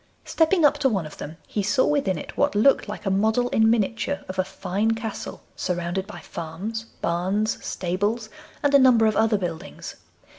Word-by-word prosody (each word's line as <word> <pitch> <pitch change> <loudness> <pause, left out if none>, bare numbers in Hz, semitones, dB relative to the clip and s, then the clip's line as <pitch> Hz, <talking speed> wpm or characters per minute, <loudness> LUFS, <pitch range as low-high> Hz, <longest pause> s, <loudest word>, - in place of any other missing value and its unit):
Stepping 325 0 +3
up 295 0 +4
to 270 -2 +3
one 195 -8 -1
of 155 - -11
them, 155 +2 -7
he 210 - -2
saw 205 +6 +2
within 275 - +1
it - - -8
what 285 -3 +1
looked 240 +7 +4
like - - -7
a 195 - +1
model 220 +5 +2
in 220 -1 +4
miniature 230 +5 0
of 185 0 -6
a - - +4
fine 200 +3 -1
castle 220 -1 -6
surrounded 180 +1 -2
by 215 - -9
farms, 190 +8 -5 0.2
barns, 190 +6 0
stables, 205 +6 -2 0.4
and 285 0 +2
a 280 - +8
number 250 -4 +6
of 215 -1 +2
other 220 -1 +3
buildings. 175 -1 -6
215 Hz, 185 wpm, -24 LUFS, 185-235 Hz, 0.4 s, a